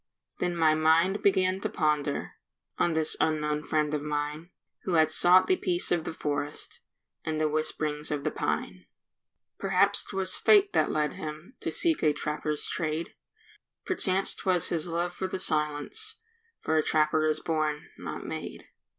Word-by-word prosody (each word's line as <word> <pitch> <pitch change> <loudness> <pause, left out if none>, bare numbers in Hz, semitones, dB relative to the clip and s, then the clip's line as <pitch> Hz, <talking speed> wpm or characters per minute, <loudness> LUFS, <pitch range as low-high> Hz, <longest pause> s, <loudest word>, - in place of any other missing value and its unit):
Then 175 -1 -1
my 160 -2 +4
mind 165 +5 +3
began 190 -1 +2
to - - -2
ponder 150 -2 -1 0.5
On 170 - +2
this 160 -1 +1
unknown 150 -1 0
friend 150 -1 0
of 150 - -1
mine, 150 +2 -3 0.3
Who 185 - -3
had 160 -1 +4
sought 180 +3 +5
the 375 - +2
peace 175 - 0
of 170 -2 +1
the - - -3
forest 145 -2 -4 0.4
And 155 -1 -2
the 155 - +2
whisp'rings 155 0 -2
of 145 -2 -2
the 155 - 0
pine. 90 -1 -3 0.7
Perhaps - - +3
'twas 190 -1 0
fate 405 -2 +5
that - - +2
led 150 -1 0
him 155 +8 -8
To - - -3
seek 330 -3 +1
a 150 -1 +3
trapper's 150 0 -3
trade; 160 -1 -3 0.7
Perchance 195 - +2
'twas 180 -2 +1
his 170 0 -1
love 170 +1 -2
for 190 +1 -3
the 190 - -4
silence, 155 - -1 0.5
For 160 - +1
a 155 - +3
trapper 155 0 +2
is 155 0 +1
born—not 155 -2 -3
made. - - -6
155 Hz, 160 wpm, -28 LUFS, 150-180 Hz, 0.7 s, sought